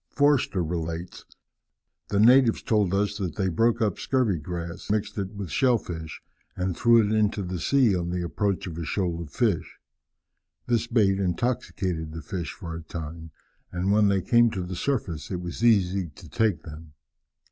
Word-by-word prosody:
Forster 145 Hz, -10 st, +2 dB
relates: 85 Hz, +1 st, -4 dB, 0.8 s
"The 100 Hz, -, 0 dB
natives 120 Hz, +1 st, +5 dB
told 105 Hz, -5 st, +2 dB
us 100 Hz, +1 st, 0 dB
that 95 Hz, -4 st, -3 dB
they 95 Hz, -2 st, 0 dB
broke 115 Hz, +6 st, +2 dB
up 105 Hz, -5 st, -1 dB
scurvy 120 Hz, -10 st, +1 dB
grass, 85 Hz, +2 st, -6 dB
mixed 105 Hz, 0 st, -1 dB
it 100 Hz, +1 st, -4 dB
with 100 Hz, -4 st, -6 dB
shell 125 Hz, -3 st, +3 dB
fish, 80 Hz, -6 st, -7 dB, 0.3 s
and 90 Hz, -1 st, -2 dB
threw 115 Hz, +1 st, +5 dB
it 105 Hz, -, 0 dB
into 105 Hz, -1 st, +1 dB
the 90 Hz, -1 st, -4 dB
sea 125 Hz, -1 st, +3 dB
on 85 Hz, -1 st, -2 dB
the 90 Hz, 0 st, -2 dB
approach 100 Hz, +2 st, -1 dB
of 85 Hz, -2 st, -6 dB
a -, -, -3 dB
shoal 85 Hz, 0 st, -2 dB
of 80 Hz, -, -7 dB
fish. 110 Hz, -10 st, -1 dB, 0.9 s
This 115 Hz, -1 st, +1 dB
bait 100 Hz, -5 st, +2 dB
intoxicated 90 Hz, -5 st, -2 dB
the 80 Hz, -1 st, -7 dB
fish 85 Hz, -2 st, -4 dB
for 85 Hz, -5 st, -7 dB
a 85 Hz, -, -6 dB
time, 80 Hz, 0 st, -7 dB, 0.4 s
and 90 Hz, +2 st, -1 dB
when 105 Hz, 0 st, +4 dB
they 100 Hz, -2 st, +1 dB
came 120 Hz, 0 st, +4 dB
to 95 Hz, -4 st, -4 dB
the 90 Hz, +1 st, -5 dB
surface 85 Hz, -, -2 dB
it 90 Hz, -, -3 dB
was 90 Hz, +5 st, -6 dB
easy 95 Hz, -5 st, +3 dB
to 80 Hz, +3 st, -14 dB
take 90 Hz, +1 st, 0 dB
them. 75 Hz, -1 st, -11 dB
95 Hz, 180 wpm, -26 LUFS, 85-110 Hz, 0.9 s, natives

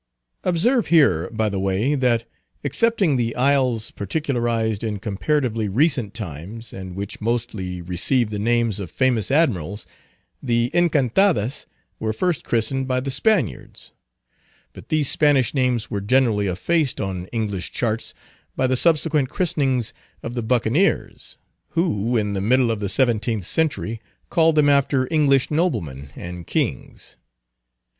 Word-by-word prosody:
Observe 220 Hz, +8 st, +2 dB
here, 95 Hz, -, +3 dB
by 110 Hz, -1 st, -1 dB
the 100 Hz, -2 st, -2 dB
way, 95 Hz, +8 st, 0 dB
that, 120 Hz, -4 st, +1 dB, 0.4 s
excepting 165 Hz, -, +2 dB
the 115 Hz, -1 st, -1 dB
isles 125 Hz, -4 st, +1 dB
particularized 115 Hz, -, -1 dB
in 110 Hz, -2 st, -2 dB
comparatively 110 Hz, +2 st, -1 dB
recent 125 Hz, -, +1 dB
times, 105 Hz, +4 st, -7 dB
and 95 Hz, -1 st, -8 dB
which 100 Hz, +2 st, -6 dB
mostly 105 Hz, -6 st, -3 dB
received 105 Hz, +7 st, 0 dB
the 105 Hz, -, -3 dB
names 115 Hz, -1 st, +1 dB
of 95 Hz, -4 st, -5 dB
famous 125 Hz, -5 st, +1 dB
Admirals, 105 Hz, -, 0 dB, 0.6 s
the 120 Hz, -1 st, 0 dB
Encantadas 150 Hz, -, +2 dB, 0.3 s
were 110 Hz, -, -1 dB
first 175 Hz, +8 st, -1 dB
christened 130 Hz, +4 st, 0 dB
by 130 Hz, -1 st, +1 dB
the 135 Hz, +1 st, -4 dB
Spaniards; 190 Hz, +8 st, -1 dB, 0.8 s
but -, -, -13 dB
these 155 Hz, -3 st, +1 dB
Spanish 145 Hz, -4 st, +2 dB
names 125 Hz, -5 st, 0 dB
were 100 Hz, -, -2 dB
generally 110 Hz, -2 st, +2 dB
effaced 140 Hz, -, 0 dB
on 95 Hz, -3 st, -4 dB
English 105 Hz, -5 st, -3 dB
charts 115 Hz, -1 st, -2 dB, 0.4 s
by 130 Hz, -, +1 dB
the 130 Hz, 0 st, +2 dB
subsequent 155 Hz, -2 st, +2 dB
christenings 135 Hz, -, 0 dB, 0.3 s
of 115 Hz, -, -5 dB
the 120 Hz, -, -2 dB
Buccaneers, 125 Hz, -, 0 dB, 0.4 s
who, 120 Hz, -, +1 dB
in 105 Hz, -2 st, -1 dB
the 95 Hz, -, -2 dB
middle 120 Hz, +3 st, +3 dB
of 110 Hz, -, -2 dB
the 100 Hz, -2 st, -2 dB
seventeenth 115 Hz, -4 st, +1 dB
century, 135 Hz, -, -1 dB, 0.3 s
called 165 Hz, -1 st, +3 dB
them 150 Hz, -1 st, +4 dB
after 140 Hz, -2 st, +2 dB
English 140 Hz, -4 st, +3 dB
noblemen 105 Hz, -, -1 dB
and 85 Hz, -1 st, -8 dB
kings. -, -, -3 dB
120 Hz, 135 wpm, -22 LUFS, 105-140 Hz, 0.8 s, them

